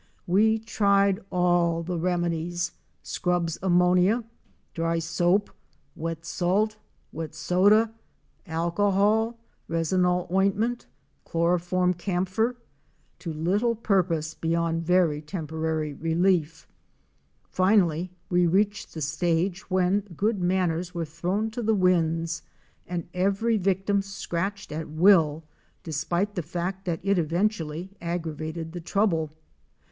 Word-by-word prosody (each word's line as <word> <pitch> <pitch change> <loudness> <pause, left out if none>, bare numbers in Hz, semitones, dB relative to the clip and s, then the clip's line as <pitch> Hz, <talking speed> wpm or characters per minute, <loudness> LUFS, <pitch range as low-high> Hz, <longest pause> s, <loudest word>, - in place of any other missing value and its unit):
We 215 +5 +3
tried 200 -3 +2
all 175 -2 +2
the 175 0 -3
remedies 175 0 -1 0.2
— - - -43
Scrubb's 175 -2 -1
ammonia, 180 +5 +3 0.5
dry 165 0 0
soap, 175 +4 +1 0.4
wet 165 0 -5
salt, 195 +6 0 0.4
wet 160 0 -6
soda, 200 +8 +3 0.5
alcohol, 200 +7 +1 0.3
resinol 180 +2 +1
ointment, 200 +6 +1 0.4
chloroform 175 +2 +1
camphor, 190 +6 -1 0.3
— - - -40
to 165 - -5
little 195 +10 +1
purpose 175 -7 0
beyond 165 0 0
very 165 -3 +2
temporary 160 -2 -3
relief. 165 0 0 0.8
Finally 185 -3 +2 0.2
we 180 -2 +3
reached 205 +3 0
the 160 - -5
stage 170 +6 -1
when 185 +1 +2 0.2
good 210 -1 0
manners 180 -1 0
were 170 -1 -1
thrown 180 +8 -2
to 240 - -4
the 220 -1 +2
winds 165 -3 +1 0.5
and 175 -1 -4
every 200 +5 +1
victim 195 0 +1
scratched 195 +1 -4
at 155 +1 -5
will, 160 -2 +4 0.4
despite 170 +6 -1
the 180 - -2
fact 180 +4 -4
that 170 -3 -2
it 200 -1 +2
eventually 170 0 -1
aggravated 165 -1 -4
the 175 0 -6
trouble. 165 -3 +1
180 Hz, 110 wpm, -26 LUFS, 165-195 Hz, 0.8 s, will